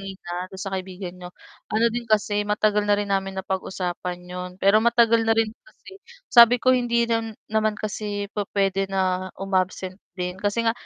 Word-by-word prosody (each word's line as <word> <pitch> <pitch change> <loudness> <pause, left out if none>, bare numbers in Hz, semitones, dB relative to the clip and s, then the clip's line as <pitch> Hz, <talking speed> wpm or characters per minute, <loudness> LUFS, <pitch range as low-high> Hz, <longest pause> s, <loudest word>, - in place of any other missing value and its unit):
kanina 185 -2 -6
dun 190 - -9
sa 195 -1 -5
kaibigan 185 -1 -6
n'yo. 180 0 -8 0.4
Ano 225 +2 +3
din 240 0 -2
kasi, 210 -1 +2
matagal 210 0 +2
na 205 - +5
rin 205 -1 -2
namin 195 0 -1
na - - -16
pag-usapan 180 -1 -3
'yon, 180 0 -6
pero 200 +3 +5
matagal 230 -1 +4
na 225 - +4
rin 225 -1 +2
kasi, 395 -5 -16 0.3
sabi 235 0 +8
ko 255 - +5
hindi 235 -1 +1 0.4
naman 215 0 +1
kasi 205 -1 -4
pu-puwede 195 -1 0
na 185 -1 0
um-absent 185 0 -1 0.2
din, 180 0 -3
kasi 205 +3 0
nga 225 - +4
200 Hz, 170 wpm, -24 LUFS, 185-220 Hz, 0.4 s, sabi